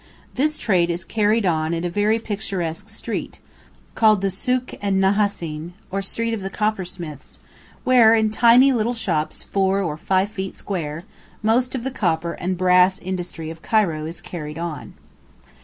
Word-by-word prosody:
This 305 +3 +1
trade 180 -5 +2
is 170 +1 -2
carried 215 0 +1
on 160 -1 +1
in 165 - -3
a - - 0
very 210 +4 +2
picturesque 195 -7 -4
street, - - -5 0.6
called 215 -3 +4
the 195 - +1
"Sûk 250 +7 -1
en 200 -1 +1
Nahassīn," 190 -5 0 0.2
or 195 +1 -1
street 230 +4 -2
of 220 - -3
the 195 - -4
coppersmiths, 180 -8 -4 0.5
where 235 -3 +6
in 220 -1 +2
tiny 240 +4 +6
little 240 -1 0
shops 160 -9 -1
4 195 0 +1
or 155 -4 -3
5 190 +4 +1
feet 195 -2 -6
square, 165 -4 -4 0.4
most 245 +4 +2
of 245 - -3
the 265 - -2
copper 170 -8 -1
and 185 +1 -3
brass 180 +1 +4
industry 175 -3 -5
of 165 0 -11
Cairo 170 -9 +1
is 165 - -7
carried 150 -3 -7
on. 165 -4 -6
190 Hz, 160 wpm, -22 LUFS, 170-220 Hz, 0.6 s, where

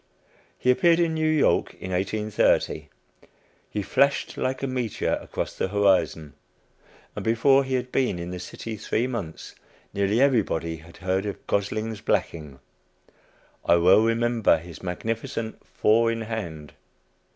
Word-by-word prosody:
He 125 - +3
appeared 170 +3 +4
in 165 -2 +2
New 155 0 +1
York 155 -2 +2
in 95 - -7
1830. 105 +3 0 0.8
He 105 - -3
flashed 140 +8 +1
like 130 +1 -2
a - - +2
meteor 125 -4 -1
across - - -5
the - - -1
horizon; 95 -7 +1 0.8
and - - -5
before 135 +5 +4
he 130 -1 -2
had 125 0 -3
been 130 -9 +1
in 85 +1 -5
the 90 - -5
city 110 +4 -7
three 110 +3 -1
months, 110 -11 -6 0.4
nearly 100 +3 +1
everybody 105 - +1
had 80 +2 -15
heard 95 +2 -1
of 100 - -6
"Gosling's 110 +2 -2
Blacking." 80 -10 -2 1.0
I - - +4
well 90 +5 +6
remember 115 -4 +2
his 85 0 -11
magnificent 110 +4 -4
"four 115 +2 +3
in 115 0 -3
hand." 85 -10 -6
110 Hz, 140 wpm, -25 LUFS, 90-120 Hz, 1.0 s, well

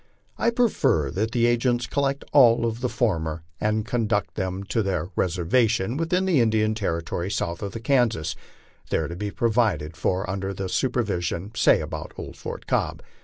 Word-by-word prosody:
I - - +2
prefer 220 - +2
that 105 +5 -1
the 120 0 +2
agents 120 0 +2
collect 140 +1 -1
all 120 -4 +6
of 115 +1 -2
the 125 - 0
former 85 -9 -1 0.2
and 110 0 0
conduct 115 -4 0
them 95 -1 -3
to 110 +3 0
their 90 -4 -1
reservation 95 +5 +1
within 170 +4 0
the 170 -9 +3
Indian 110 -1 +2
territory 85 -3 -2
south 85 -4 -2
of 100 -2 -4
Kansas, 120 - +1 0.5
there 80 - 0
to 85 - -6
be 105 +3 -3
provided 100 -6 0
for 90 +5 -1
under 95 0 -3
their 95 0 -4
supervision, 100 -7 -1
say 110 - +4
about 75 -1 -6
old - - -7
Fort - - -7
Cobb. - - -1
105 Hz, 165 wpm, -25 LUFS, 90-120 Hz, 0.5 s, all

